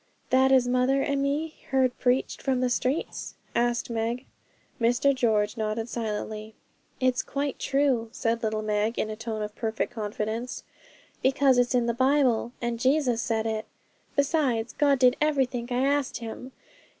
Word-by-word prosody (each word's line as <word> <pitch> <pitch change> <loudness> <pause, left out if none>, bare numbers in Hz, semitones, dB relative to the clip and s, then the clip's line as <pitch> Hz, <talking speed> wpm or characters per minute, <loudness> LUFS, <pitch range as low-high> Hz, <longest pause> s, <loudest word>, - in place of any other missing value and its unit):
'That 265 +1 +5
as 255 -2 +5
mother 255 +2 +2
and 280 -1 0
me 300 +3 -1
heard 260 -2 +2
preached 250 +1 +1
from 265 -2 0
the 250 -1 +1
streets?' 260 +6 -2 0.2
asked 240 0 +1
Meg. 235 +2 -2 0.6
Mr 245 +4 +3
George 220 -4 +1
nodded 220 +1 -2
silently. 215 -1 -4 0.4
'It's 255 -1 +2
quite 280 -1 -3
true,' 270 -5 +1
said 230 -1 -1
little 215 -1 -1
Meg, 215 +2 0
in 215 - -1
a - - -4
tone 220 -1 -4
of 210 0 -5
perfect 225 +1 -2
confidence, 220 +2 -4 0.6
'because 265 -1 +4
it's 245 +1 +2
in 245 -1 +3
the 235 - +1
Bible, 260 -2 +2
and 235 -1 -1
Jesus 255 -2 +2
said 225 -1 -1
it. 220 -1 -2 0.5
Besides, 270 -6 +1
God 285 -2 +3
did 250 0 +4
everythink 265 -5 0
I 250 +2 +1
asked 285 -1 +1
Him. 245 +2 -7
245 Hz, 155 wpm, -27 LUFS, 225-265 Hz, 0.6 s, That